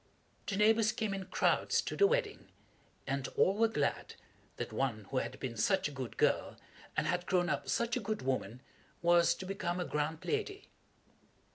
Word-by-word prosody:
The 200 - -1
neighbors 220 +1 +4
came 215 -3 -2
in 195 -1 -4
crowds 185 - +2
to - - -4
the 400 - +5
wedding, 470 -2 -1 0.6
and 135 0 -2
all 190 - +5
were 225 +2 +4
glad 150 -10 -2 0.4
that - - -5
one 120 -6 -1
who 135 - -1
had - - -5
been 125 -3 -4
such 185 - +2
a - - -7
good 130 -4 -6
girl, - - +1 0.4
and - - +2
had 180 0 -1
grown 180 -2 +2
up - - -2
such 235 0 +1
a - - 0
good 215 -3 -3
woman, 130 -2 -2 0.4
was 170 0 +5
to 190 - -7
become 185 -2 -2
a 180 - -1
grand 155 +2 -2
lady. 415 -2 -3
180 Hz, 180 wpm, -33 LUFS, 145-220 Hz, 0.6 s, the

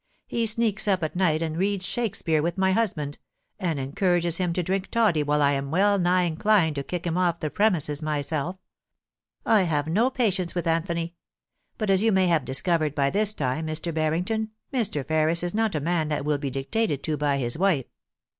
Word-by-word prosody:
He 230 -1 -1
sneaks 220 -1 +2
up 190 -4 +1
at 155 - -3
night, 165 -3 +2
and 160 -1 -3
reads 195 +1 0
Shakespeare 180 -10 -1
with 170 +4 -2
my 190 0 +2
husband, 175 -9 -1 0.4
and 165 -6 -1
en 135 0 -4
courages 175 -1 +1
him 180 -2 0
to 180 - -1
drink 190 +2 -2
toddy 210 -10 +2
till 145 - -3
I 140 - +4
am 140 0 -2
well 200 +5 +3
nigh 180 0 +3
inclined 175 0 +2
to 140 - -2
kick 175 +4 -5
him 170 +1 0
off 175 -2 +1
the 155 - -3
premises 170 -9 +1
myself. 155 +3 -2 0.9
I 220 -2 +4
have 155 -5 0
no 210 +11 +2
patience 195 -10 -1
with 175 - -2
Anthony; 165 0 -1 0.6
but 215 -3 0
as 190 0 +4
you 225 +1 +3
may 190 -2 +3
have 165 -6 +2
discovered 150 +2 0
by 140 -1 +1
this 210 0 +2
time, 155 -4 -2
Mr. 155 +2 -2
Bartington, 175 +8 -1 0.2
Mr. 210 - -1
Ferris 160 +2 +1
is 175 - -2
not 220 -3 0
a - - +1
man 160 +1 0
that 145 -2 -2
will 150 -1 0
be 140 -1 -3
dictated 140 - -2
to 155 - -1
by 145 -1 0
his 120 -3 -1
wife.' 170 -7 +1
170 Hz, 200 wpm, -25 LUFS, 155-195 Hz, 0.9 s, I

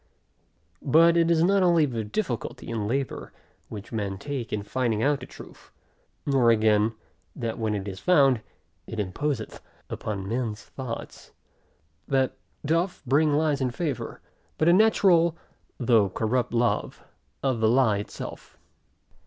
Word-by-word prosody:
But 165 +4 +5
it 170 -1 +3
is 165 -1 +3
not 195 +2 +3
only 170 -4 +4
the 120 -5 -3
difficulty 120 - -4
and 110 -3 -2
labor, 135 +3 -3 0.4
which 105 0 -8
men 100 -4 -3
take 130 +2 -5
in 105 -1 -2
finding 115 0 -1
out 145 0 +2
of - - -9
truth, - - -13 0.6
nor 135 -4 +3
again, 110 0 +3 0.4
that 115 0 -4
when 110 -2 0
it 100 0 -4
is 95 -1 -6
found, 140 -9 +4 0.5
it 110 - -6
imposeth 110 +5 -3 0.3
upon 100 -3 -4
men's 115 -1 -3
thoughts, 130 -4 -8 0.7
that 135 -1 +1 0.3
doth 165 +5 0
bring 150 +4 +3
lies 150 -2 +1
in 130 - +1
favor; 145 0 -4 0.4
but 155 - +2
a 170 - +7
natural, 180 -5 +4 0.4
though 115 -6 +3
corrupt 115 +6 -1
love, 120 0 0 0.4
of 130 -4 +1
the 110 0 +3
lie 115 -4 +3
itself. 105 - -8
125 Hz, 140 wpm, -26 LUFS, 110-150 Hz, 0.7 s, a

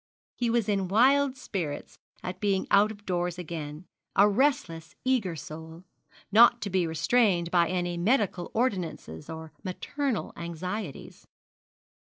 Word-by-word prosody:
He 240 -1 0
was 230 -2 +1
in 195 -3 0
wild 265 +6 +4
spirits 170 - -5 0.2
at 180 - -5
being 200 -2 +1
out 205 +2 +5
of 205 -1 -12
doors 175 -1 -1
again, 160 -2 -6 0.3
a 200 - +7
restless 200 - 0
eager 230 -10 +1
soul, 160 +3 -9 0.5
not 235 +3 +7
to 200 - -3
be 180 -2 +2
restrained 170 +1 +2
by 170 -2 +3
any 175 -1 -1
medical 195 -2 +1
ordinances 185 - -2
or 160 -1 -8
maternal 250 +7 -3
anxieties. 170 0 -6
185 Hz, 130 wpm, -28 LUFS, 170-220 Hz, 0.5 s, a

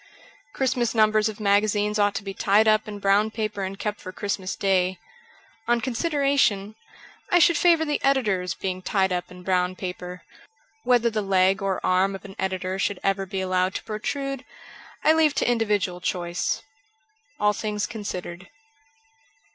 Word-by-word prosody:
Christmas 245 -3 0
numbers 215 0 +3
of 215 - -8
magazines 210 +1 +2
ought 205 0 +2
to - - -3
be 195 -1 -5
tied 205 +3 +3
up 215 0 +3
in 210 -1 -6
brown 200 +2 +3
paper 215 -2 -3
and 190 0 -4
kept 210 +1 -4
for 185 - -7
Christmas 190 -1 -3
Day. 190 -1 +1 0.7
On 240 0 +3
consideration, 260 -5 +1 0.6
I 355 - +4
should 340 0 +5
favour 335 -1 +4
the 295 -1 -2
editors 210 -10 +1
being 185 -1 -4
tied 190 -1 +1
up 180 0 -3
in 180 0 -12
brown 180 0 +1
paper. 180 -1 -7 0.6
Whether 240 - +3
the 215 -1 -1
leg 190 -1 +2
or 195 -1 -1
arm 190 +2 +2
of 195 - -10
an 195 -1 -10
editor 190 0 -2
should 200 -1 -1
ever 195 0 0
be 190 0 -3
allowed 185 0 0
to - - -4
pro 215 -1 -5
trude 275 +2 -3 0.6
I 315 - +6
leave 315 -2 +3
to - - +1
individual 205 -6 0
choice. 175 -1 -2 0.8
'Jll 210 0 +3
Things 210 -2 -2
Considered.' 185 -4 -6
205 Hz, 165 wpm, -24 LUFS, 185-220 Hz, 0.8 s, I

